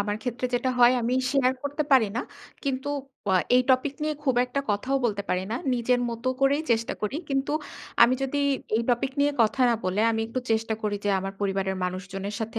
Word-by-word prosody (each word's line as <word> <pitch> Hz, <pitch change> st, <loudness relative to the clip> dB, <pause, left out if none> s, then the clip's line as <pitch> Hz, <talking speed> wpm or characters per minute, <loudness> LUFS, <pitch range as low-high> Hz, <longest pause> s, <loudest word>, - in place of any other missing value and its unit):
আমার 205 Hz, 0 st, -1 dB
ক্ষেত্রে 245 Hz, 0 st, -2 dB
যেটা 255 Hz, +1 st, +1 dB
হয় 240 Hz, 0 st, +7 dB
আমি 240 Hz, +2 st, 0 dB, 0.2 s
শেয়ার 265 Hz, -2 st, +3 dB
করতে 285 Hz, +2 st, -1 dB
পারি 255 Hz, -5 st, +6 dB
না। -, -, +1 dB, 0.4 s
কিন্তু 270 Hz, 0 st, -2 dB, 0.4 s
আ -, -, +4 dB, 0.2 s
এই 255 Hz, -, +6 dB
টপিক 260 Hz, +2 st, +2 dB
নিয়ে 305 Hz, 0 st, 0 dB
খুব 265 Hz, -3 st, +2 dB
একটা 250 Hz, +3 st, -2 dB
কথাও 255 Hz, +7 st, 0 dB
বলতে 205 Hz, -4 st, 0 dB
পারি 180 Hz, 0 st, 0 dB
না। -, -, -1 dB, 0.2 s
নিজের 245 Hz, +1 st, +1 dB
মতো 235 Hz, +2 st, -3 dB
করেই 280 Hz, +3 st, +3 dB
চেষ্টা 230 Hz, 0 st, +1 dB
করি। 210 Hz, +7 st, -1 dB
কিন্তু 275 Hz, 0 st, 0 dB, 0.5 s
আমি 250 Hz, -, +6 dB
যদি 270 Hz, +2 st, -1 dB, 0.4 s
এই 230 Hz, -, +1 dB
টপিক 245 Hz, +2 st, +1 dB
নিয়ে 290 Hz, +1 st, +4 dB
কথা 230 Hz, +5 st, +2 dB
না 235 Hz, -, +3 dB
বলে 185 Hz, +3 st, 0 dB
আমি 225 Hz, 0 st, -1 dB
একটু 230 Hz, +3 st, -3 dB
চেষ্টা 225 Hz, 0 st, +1 dB
করি 210 Hz, -1 st, -1 dB
যে -, -, +1 dB
আমার 195 Hz, +1 st, -4 dB
পরিবারের 195 Hz, -1 st, -1 dB
মানুষজনের 195 Hz, +2 st, -4 dB
সাথে 225 Hz, +1 st, -3 dB
240 Hz, 205 wpm, -26 LUFS, 210-265 Hz, 0.5 s, হয়